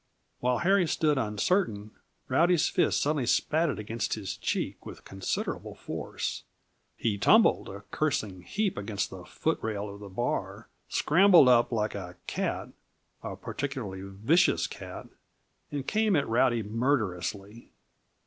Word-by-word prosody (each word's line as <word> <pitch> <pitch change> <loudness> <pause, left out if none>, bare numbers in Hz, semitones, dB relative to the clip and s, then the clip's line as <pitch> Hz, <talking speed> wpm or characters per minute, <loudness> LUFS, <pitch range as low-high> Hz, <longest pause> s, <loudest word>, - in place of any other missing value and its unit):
While 125 0 +1
Harry 185 0 +3
stood 150 -3 +1
uncertain, 105 - 0 0.4
Rowdy's 170 +5 +3
fist - - +2
suddenly 145 -4 0
spatted 155 +2 +2
against 110 +2 -2
his 105 -3 -5
cheek - - -3
with - - -10
considerable 95 -1 -4
force. - - -4 0.6
He 105 -3 -1
tumbled, 220 - +4
a 100 +1 -8
cursing 110 -11 -1
heap, 200 - -2
against 100 0 -3
the - - -9
foot - - -1
rail 105 -2 -3
of 100 - -11
the 100 -1 -9
bar, 120 +6 -3 0.2
scrambled 175 -2 +6
up 120 -1 +5
like 110 -2 0
a 90 -3 -7
cat - - -2 0.5
a - - -5
particularly 125 -10 -5
vicious 110 - +2
cat - - -8 0.7
and 145 -2 -3
came 215 +1 +2
at 145 -2 +1
Rowdy 115 0 +2
murderously. 105 - -2
120 Hz, 130 wpm, -28 LUFS, 100-155 Hz, 0.7 s, scrambled